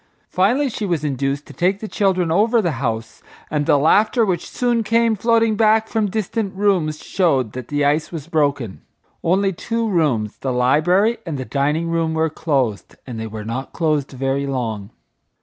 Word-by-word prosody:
Finally 240 +10 +2
she 225 -3 -5
was 170 -7 -1
induced 140 0 -2
to - - -12
take 190 +3 +1
the 215 - -6
children 185 -5 +1
over 225 +7 +3
the 175 -6 0
house, 115 -3 -3 0.3
and 150 -1 -1
the - - +5
laughter 215 - +3
which 180 -4 -2
soon 240 -2 0
came 230 +1 +2
floating 230 +1 +2
back 220 +1 +3
from 220 -3 0
distant 210 0 -2
rooms 185 -7 +1
showed 140 - +1
that 125 0 -7
the 145 0 0
ice 150 +2 +1
was 160 -5 -6
broken. 145 - -1 0.4
Only 195 +3 +2
two 230 +6 -2
rooms, 145 - 0
the 135 - -3
library 160 - +2
and 160 -5 -4
the 130 - -5
dining 150 +5 0
room, 165 -1 0
were 160 0 +1
closed, 135 -10 -1
and 120 -4 -7
they 110 - -4
were 110 -1 -7
not 125 +4 -5
closed 155 -4 0
very 135 +2 -1
long. 115 -7 -3
160 Hz, 180 wpm, -20 LUFS, 135-205 Hz, 0.4 s, the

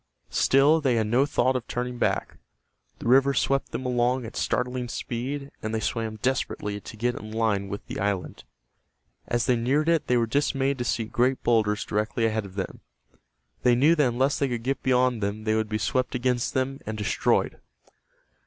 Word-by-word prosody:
Still 145 +4 +4
they 130 -4 +2
had 110 -1 +1
no 125 +6 +2
thought 130 -2 +1
of 125 -2 -3
turning 125 0 -3
back. - - -1 0.6
The - - -6
river 135 +2 +5
swept 135 0 +1
them 130 - -4
along 125 0 +1
at 110 - -9
startling 125 0 -1
speed, 135 +5 -4
and 110 +1 -3
they - - 0
swam 110 -1 -2
desperately 115 -5 -1
to 110 - -10
get 120 +3 0
in 110 -2 -8
line 110 -3 0
with 100 +1 -6
the - - -6
island. 100 -2 -2 0.8
As 120 -1 0
they 125 - +3
neared 135 +7 +1
it 165 -2 +2
they 125 - +3
were 115 - +2
dismayed 135 +1 0
to - - 0
see 115 -1 0
great 125 +4 0
boulders 105 -3 +2
directly 105 +2 -1
ahead 110 -1 0
of 95 - -15
them. 95 - -4 0.8
They 125 -1 +4
knew 145 +7 +5
that 150 -5 +3
unless 130 +4 +1
they 140 - +2
could 120 -2 -3
get 135 +2 -1
beyond 125 -2 +2
them 100 +2 -2
they 110 0 +1
would 110 -1 0
be 110 - 0
swept 130 +4 -1
against 125 -1 0
them 135 +1 -1
and 110 0 -3
destroyed. 105 - 0
120 Hz, 190 wpm, -26 LUFS, 110-130 Hz, 0.8 s, river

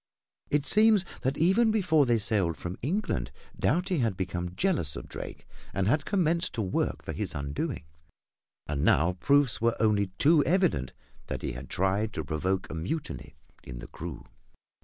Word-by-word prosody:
It 145 -1 +1
seems 215 -1 +5 0.2
that 135 +2 -1
even 190 +8 +4
before 175 -10 +3
they 120 -1 +4
sailed 100 -6 +1
from 90 +1 -5
England, 140 - -1 0.3
Doughty 175 +4 +1
had 115 -7 0
become 90 -2 -3
jealous 160 - 0
of - - -7
Drake - - -8 0.3
and 95 0 +1
had 145 +7 +2
commenced 170 -2 +1
to 110 - -1
work 95 - -1
for - - -5
his - - -4
undoing. 70 0 -3 0.8
And 70 -1 -2
now 85 +5 +4
proofs 140 -2 +3
were 115 0 +2
only 105 -3 +3
too 155 0 +5
evident 170 - +1 0.3
that - - -5
he - - -2
had 65 +2 -8
tried 100 +4 0
to - - -4
provoke 90 +4 -1
a - - -5
mutiny 135 - -4 0.3
in 60 - -8
the - - -8
crew. - - -7
115 Hz, 165 wpm, -28 LUFS, -, 0.8 s, seems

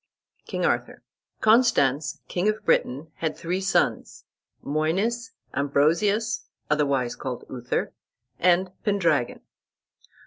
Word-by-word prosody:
KING - - -1
ARTHUR - - -1 0.4
Constans, 160 - +3
king 185 +4 0
of 215 0 -3
Britain, 145 +5 +1
had 160 -2 -2
three 180 +3 -2
sons, 190 0 0 0.4
Moines, 195 - -1 0.2
Ambrosius, 175 - +1 0.2
otherwise 140 -5 +1
called 130 -2 -5
Uther, 125 -1 -2 0.5
and 180 +1 +3
Pendragon. 190 - +1
165 Hz, 95 wpm, -25 LUFS, 140-205 Hz, 0.5 s, Constans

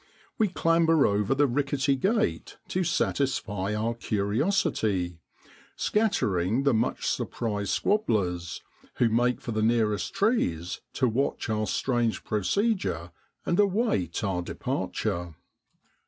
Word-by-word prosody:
We 220 - +4
clamber 165 -3 +3
over 105 +4 +1
the 145 +1 +4
rickety 140 +1 +1
gate 215 - 0
to 185 - 0
satisfy 110 - -1
our 110 +2 0
curiosity, 105 - 0 0.6
scattering 120 - +1
the 140 -2 +3
much 110 - 0
surprised 105 -4 -2
squabblers, 95 - 0 0.3
who 120 - +3
make 120 +2 +1
for 120 - -5
the 110 -1 -1
nearest 110 -2 +1
trees 90 - 0
to 130 - +2
watch 125 +1 -1
our 110 0 0
strange 120 -3 0
procedure 105 - 0 0.3
and 175 - +1
await 200 - +1
our 95 -3 0
departure. 85 -1 -3
115 Hz, 110 wpm, -27 LUFS, 100-165 Hz, 0.6 s, We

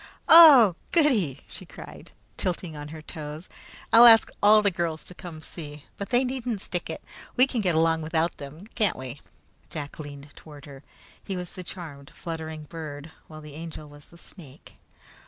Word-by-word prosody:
"Oh, 285 - +9 0.2
goody!" 235 - +1
she - - -11
cried, - - -12 0.3
tilting 175 -3 -4
on 145 0 -8
her 155 0 -10
toes. 155 +1 -9 0.5
"I'll 235 +1 +10
ask 225 -1 +7
all 210 +1 +6
the 200 - +2
girls 165 -3 -3
to - - -12
come 165 -3 -10
see, 150 -3 -10
but 200 - -7
they 245 +1 +2
needn't 250 -5 -4
stick 175 -3 -5
in! - - -4 0.4
We 255 - +5
can 255 -4 -3
get 180 -5 0
along 160 0 +2
without 160 +2 -1
them, 150 +6 -11
can't 210 -5 0
we?" 130 +1 -9 0.5
Jack 145 -1 -8
leaned 145 -1 -10
toward 150 -3 -14
her. 140 -2 -12 0.4
He 195 -2 -5
was 180 -1 -7
the 185 - -8
charmed 155 -6 -10
fluttering 160 -2 -7
bird, 150 -1 -9 0.2
while 155 -1 -11
the 150 -1 -12
Angel 155 -1 -9
was 145 0 -15
the 170 - -19
snake. 165 -6 -15
165 Hz, 175 wpm, -25 LUFS, 150-200 Hz, 0.5 s, I'll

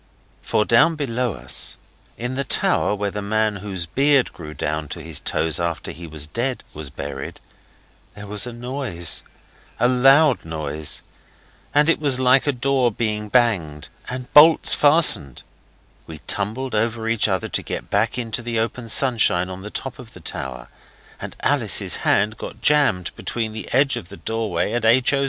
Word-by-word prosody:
For, 105 - 0
down 165 +8 +4
below 125 -5 -2
us, 60 -5 -3 0.4
in 120 +2 -4
the 135 +1 -2
tower 105 - +1
where 100 0 -3
the 105 - -5
man 110 0 0
whose 95 -3 -4
beard 140 - +2
grew 75 -2 -10
down 75 0 -3
to 85 - -7
his 80 -2 -1
toes 80 -1 -1
after 85 -1 -3
he 85 0 -10
was 75 -2 -3
dead 120 - -3
was 75 -2 -6
buried, 70 0 -7 0.8
there 105 - -9
was 105 +3 0
a - - -6
noise 120 - -1 0.6
a 120 - +3
loud 135 +2 +4
noise. 80 -2 -4 0.7
And 145 +1 +3
it 165 - +2
was 140 -4 +2
like 130 +2 +3
a - - +4
door 130 -1 +1
being 105 -1 -3
banged 95 -12 0 0.2
and 125 0 -7
bolts 155 +2 +7
fastened. 145 - +5 0.6
We 80 - -9
tumbled 110 +6 -2
over 115 +1 -1
each 115 -2 +2
other 95 -3 -2
to - - -1
get - - -7
back 110 +4 0
into 115 -1 -3
the 120 -1 -4
open 115 +1 -3
sunshine 110 -8 +3
on 95 +1 -8
the 105 - -7
top 135 +4 -5
of 120 -3 -12
the - - -12
tower, 65 -2 -6 0.5
and - - -7
Alice's - - +2
hand 105 +2 +1
got 110 - -8
jammed 115 -9 +2
between 110 -2 -4
the 110 - -8
edge 135 0 +2
of 95 -7 -8
the 100 - -10
doorway 110 -6 -2
and 120 -1 -1
H. 120 +4 +3
O. 140 - +1
110 Hz, 175 wpm, -21 LUFS, 90-125 Hz, 0.8 s, bolts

